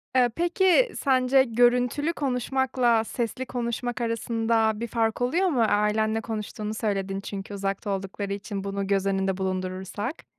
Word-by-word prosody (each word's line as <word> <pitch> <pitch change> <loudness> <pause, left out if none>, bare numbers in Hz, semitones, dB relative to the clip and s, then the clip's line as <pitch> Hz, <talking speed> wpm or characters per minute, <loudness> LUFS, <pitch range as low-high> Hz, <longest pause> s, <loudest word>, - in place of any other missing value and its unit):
Eee, 245 -1 +5
peki, 380 +7 +3
sence 260 -1 +4
görüntülü 245 +6 +2
konuşmakla 255 -3 +1
sesli 240 +3 -3
konuşmak 240 -1 -3
arasında 225 -1 +1
bir 235 - -3
fark 225 0 0
oluyor 340 +10 +2
mu? 265 -9 +1
Ailenle 215 +1 +1
konuştuğunu 215 -1 -4
söyledin 195 -3 -2
çünkü 200 0 -6
uzakta 200 +1 -3
oldukları 195 +1 -3
için 200 -1 -5
bunu 200 0 -3
göz 195 -1 +1
önünde 195 -1 0
bulundurursak? 190 - -4
225 Hz, 135 wpm, -26 LUFS, 200-250 Hz, -, Eee